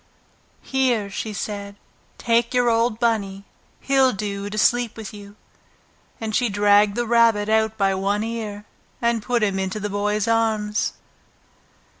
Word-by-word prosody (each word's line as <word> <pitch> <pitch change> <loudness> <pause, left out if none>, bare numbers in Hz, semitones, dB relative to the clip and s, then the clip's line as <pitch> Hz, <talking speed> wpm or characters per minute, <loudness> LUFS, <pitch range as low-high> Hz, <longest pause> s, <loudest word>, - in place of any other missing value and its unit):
"Here," 245 -7 0
she 220 - -4
said, 200 0 -5 0.4
"take 235 +1 +1
your 245 -1 +3
old 230 0 +1
Bunny! 200 -5 -1 0.4
He'll 270 -1 +3
do 200 0 -4
to 210 - -6
sleep 240 +1 +2
with 220 -1 -8
you!" 205 0 -12 0.8
And 220 -1 -3
she 245 -2 +2
dragged 205 0 +3
the 240 - -1
Rabbit 225 -3 +3
out 220 0 +1
by 195 -1 +2
one 200 +2 -1
ear, 215 -2 -5 0.3
and 235 -1 +1
put 235 +2 0
him 195 -2 0
into 190 +2 -3
the 210 0 -4
Boy's 210 +1 -1
arms. 220 -2 0
215 Hz, 145 wpm, -22 LUFS, 205-230 Hz, 0.8 s, your